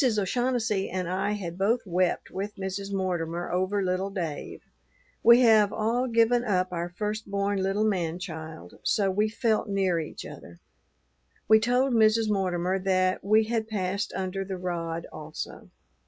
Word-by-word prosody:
Mrs. 245 -6 +2
O'Shaughnessy 225 -1 0
and 185 -1 -3
I 185 +3 -1
had 180 -4 -5
both 225 +5 +1
wept 180 -1 0
with 200 +2 -4
Mrs. 195 0 -4
Mortimer 175 -3 -2
over 185 +3 0
little 185 +1 -1
Dave. 170 -7 -5 0.6
We 235 +2 +7
have 220 -4 +5
all 235 +4 0
given 235 +1 +3
up 185 -5 0
our 170 0 -2
first 210 +3 -4
born 200 0 0
little 195 +2 +1
man 175 -6 0
child; 160 - -8
so 195 -2 +1
we 210 +3 +1
felt 225 -1 0
near 190 -4 +1
each 155 - -6
other. 85 0 -11 0.9
We 220 0 +7
told 250 +4 +2
Mrs. 220 -1 +4
Mortimer 185 -1 0
that 185 -1 +1
we 215 +2 +4
had 220 0 -2
passed 200 -2 -2
under 190 0 -2
the 190 -1 -5
rod 170 -2 -3
also. 155 0 -7
195 Hz, 155 wpm, -27 LUFS, 180-215 Hz, 0.9 s, We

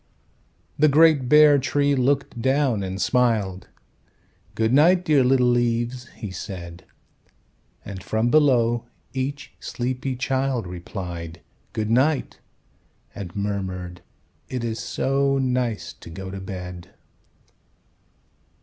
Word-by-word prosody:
The 155 - +6
great 150 -3 +5
bare 150 -1 +7
Tree 145 +2 +1
looked 135 -2 0
down 130 -4 +1
and 95 0 -4
smiled. 105 -3 +1 0.9
"Good 110 +1 +1
night, 175 +6 +5
dear 145 -4 +4
little 125 0 +3
leaves," 120 +1 0
he 105 -4 -6
said. 90 -2 -8 1.0
And 95 -2 -7
from 110 +5 0
below 120 -6 +3 0.3
each 135 +2 -4
sleepy 130 +1 -3
child 130 -2 -1
Replied, 85 -2 -7 0.3
"Good 110 0 -2
night," 135 +4 +1 0.7
and 95 -4 -8
murmured, 95 -3 -4 0.5
"It 125 -2 -3
is 115 -1 -3
so 135 +3 0
nice 125 -4 -1
to - - -13
go 95 +3 -7
to 95 - -6
bed!" 90 -2 -8
120 Hz, 110 wpm, -23 LUFS, 95-135 Hz, 1.0 s, bare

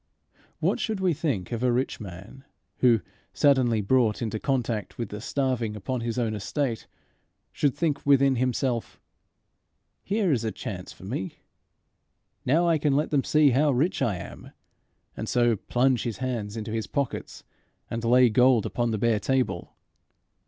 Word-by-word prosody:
What - - +1
should 220 -3 -2
we 185 -2 +2
think 135 - -2
of 115 -1 -3
a 125 -1 +3
rich 125 +2 -1
man, 100 +6 -10 0.3
who, 120 -4 +4 0.3
suddenly 130 -6 +3
brought 110 0 +2
into 110 -2 -3
contact 120 -6 -2
with 115 -4 -4
the 105 0 -7
starving 125 -3 -1
upon 120 +5 -3
his 115 0 -3
own 115 -3 0
estate, 115 +3 -2 0.6
should 145 -5 0
think 160 -4 -1
within 140 -2 +4
himself, 125 -1 -1 1.0
"Here 200 -3 +1
is 120 -5 +1
a 110 - -1
chance 90 -2 -6
for - - -15
me! 95 -1 -5 1.1
Now 165 +7 +3
I 165 -2 +3
can 145 -2 +2
let 150 +3 0
them 140 -3 +2
see 150 -2 +4
how 145 +5 +3
rich 145 +8 +1
I 105 - +1
am!" 90 - -9 0.7
and - - -5
so 120 -2 +3
plunge 125 +3 +1
his 115 -3 -3
hands 115 -5 -3
in 110 - -4
his 110 0 -3
pockets 140 -4 -3 0.4
and 115 0 -4
lay 125 +2 +5
gold 125 -1 +4
upon 120 -1 -1
the 110 - -1
bare 110 0 +2
table? 125 -8 -1
125 Hz, 160 wpm, -26 LUFS, 110-135 Hz, 1.1 s, lay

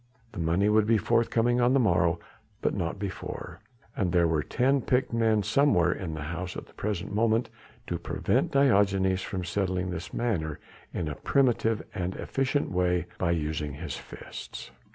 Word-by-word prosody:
The - - -8
money 85 +5 +2
would 105 0 +4
be 115 0 +5
forthcoming 115 +2 +2
on 120 +1 +4
the 135 - +4
morrow 85 -6 +3 0.4
but - - +2
not 85 +4 -2
before, 100 -1 -6 0.4
and 95 -4 0
there 85 -1 +4
were 80 -2 +1
ten 135 - +1
picked 125 0 +1
men 110 -2 +3
somewhere 105 - +3
in 85 -4 -4
the 75 - -5
house 90 +4 -4
at - - -7
the - - -21
present 100 -1 -3
moment 115 +2 +2 0.3
to - - -3
prevent - - 0
Diogenes 100 -8 +3
from 95 -1 -4
settling 90 0 -1
this 85 0 -5
matter 80 -11 -1 0.3
in 85 - -3
a 75 - -2
primitive 115 - +1
and 90 0 -3
efficient 135 +2 -1
way 90 -1 +1
by 90 - +1
using 75 -3 -1
his - - -5
fists. - - -9
95 Hz, 170 wpm, -28 LUFS, 85-115 Hz, 0.4 s, be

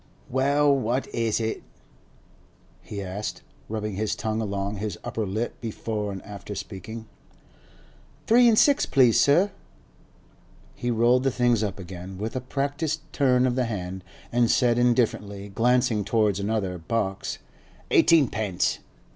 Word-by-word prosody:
'Well, 140 +2 +3
what 130 0 0
is 115 -2 0
it?' 110 -1 -2 1.2
he 100 -2 -6
asked, 95 +3 -5 0.3
rubbing 105 -1 -3
his 110 0 -1
tongue 110 0 -2
along 100 -1 -3
his 105 -2 -4
upper 110 -2 -3
lip 110 +5 -3
before 110 -2 -3
and 95 -1 -7
after 105 0 -8
speaking. 100 +3 -7 1.2
'Three 240 +1 +6
an' 225 - +4
six, 280 +5 +4
please, 125 -4 +4
sir.' 175 +8 +4 1.2
He 120 - -4
rolled 120 +2 +3
the 135 - +2
things 120 -3 +2
up 105 -2 -2
again 95 0 -8
with 110 +5 -4
a 130 - -1
practised 145 +4 -2
turn 130 -3 +3
of 125 - +1
the 130 0 0
hand, 95 -4 -5 0.3
and 120 -1 +3
said 120 -2 +3
indifferently, 105 -5 0
glancing 120 +1 +2
towards 105 -2 +1
another 100 -3 -2
box, 95 +2 -2 0.5
'Eighteenpence. 110 - +3
110 Hz, 135 wpm, -25 LUFS, 100-125 Hz, 1.2 s, Three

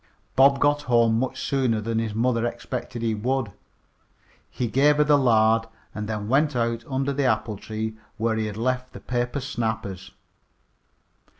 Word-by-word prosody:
Bob 135 +1 +5
got 145 0 +3
home 115 -4 +3
much 130 +1 -2
sooner 130 -5 0
than 115 +1 -1
his 110 -2 -3
mother 115 0 +1
expected 120 0 -4
he 115 -1 +1
would. 120 +1 -1 1.0
He 125 - -3
gave 145 +6 +3
her 150 - +5
the 150 0 +4
lard, 115 -4 +3 0.3
and 105 0 -5
then 105 -1 -3
went 145 +4 +2
out 115 -1 -1
under 135 +1 -1
the 140 0 0
apple 110 -2 0
tree 110 +1 -5 0.2
where 115 0 0
he 110 -1 -1
had 105 0 -6
left 125 +2 -2
the - - -8
paper 120 +2 -2
snappers. 110 -8 -4
120 Hz, 165 wpm, -24 LUFS, 110-130 Hz, 1.0 s, Bob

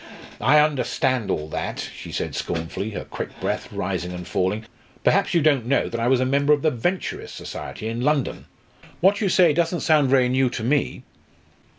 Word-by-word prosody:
"I 140 +6 +5
understand 130 -4 +1
all 75 0 -1
that," - - -4
she - - -9
said - - -3
scornfully, 85 +5 -3
her 105 - -6
quick - - -7
breath - - -3
rising 90 0 -3
and 90 0 -7
falling. 95 +5 -1 0.4
"Perhaps - - +2
you 165 - +4
don't 140 -6 +3
know 140 - +2
that 115 - -4
I 115 - +1
was 130 0 +4
a 130 - +2
member 140 +3 +3
of 145 - 0
the 155 - +3
Venturist 175 +10 -3
Society 110 - -6
in 115 +1 -3
London? 145 0 0 0.5
What 195 +4 +3
you 200 - +2
say 175 -3 +5
doesn't 170 +2 0
sound 150 -4 +3
very 130 -2 +4
new 130 0 +2
to 115 - -5
me!" 140 +5 0
130 Hz, 190 wpm, -23 LUFS, 115-150 Hz, 0.5 s, I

